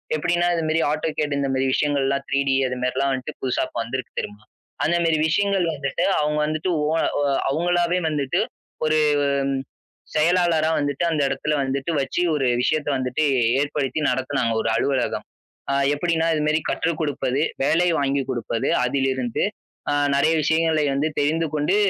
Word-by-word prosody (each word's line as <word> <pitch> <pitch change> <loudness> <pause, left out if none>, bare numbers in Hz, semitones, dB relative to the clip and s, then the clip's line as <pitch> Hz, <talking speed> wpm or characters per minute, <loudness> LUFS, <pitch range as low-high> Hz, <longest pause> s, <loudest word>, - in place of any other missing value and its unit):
எப்படின்னா 175 +2 +1
இந்த 165 -1 -1
மாரி 160 +1 +2
ஆட்டோகேட் 150 -2 -1
இந்த 140 - 0
மாரி 130 0 +1
விஷயங்கள்லாம் 140 -2 0
த்ரீ 140 - +1
டி 135 - +3
அது 125 - -3
மாரிலாம் 135 +2 0
வந்துட்டு 130 -1 -5
புதுசா 130 -2 0
இப்ப 120 - -6
வந்திருக்கு 130 +2 -6
தெரியுமா? 105 +1 -7 0.4
அந்த 170 - +2
மாரி 160 -2 +2
விஷயங்கள் 195 +2 +1
வந்துட்டு 140 +4 -2 0.2
அவங்க 150 0 0
வந்துட்டு 155 +4 -2 0.2
ஒ, - - +1 0.3
ஒ, 145 - +1 0.3
அவங்களாவே 175 +3 +1
வந்துட்டு 150 +3 -1 0.5
ஒரு 155 0 +2 1.2
செயலாளரா 165 0 +3
வந்துட்டு 145 +2 -1
அந்த 150 -2 0
இடத்துல 135 +3 -1
வந்துட்டு 135 +4 -2
வச்சு 155 +5 -2
ஒரு 135 -3 +1
விஷயத்தை 155 +1 0
வந்துட்டு 130 +4 -1 0.4
ஏற்படுத்தி 145 0 -2
நடத்துனாங்க 130 -2 0
ஒரு - - -1
அலுவலகம். 130 +1 0 0.5
ஆ, - - +1 0.2
எப்படின்னா 165 +2 0
இது 155 - 0
மாரி 155 +1 +2
கற்றுக் 165 -1 -1
குடுப்பது, 140 -3 -1 0.3
வேலை 175 +4 +3
வாங்கி 140 -1 0
குடுப்பது 115 -2 -2 0.2
அதிலிருந்து 130 -2 -1 0.5
ஆ, - - +1 0.2
நிறைய 155 +3 +3
விஷயங்களை 160 0 +2
வந்து 140 +3 +1
தெரிந்து 160 +3 +1
கொண்டு, 150 +5 +1
150 Hz, 155 wpm, -23 LUFS, 135-160 Hz, 1.2 s, டி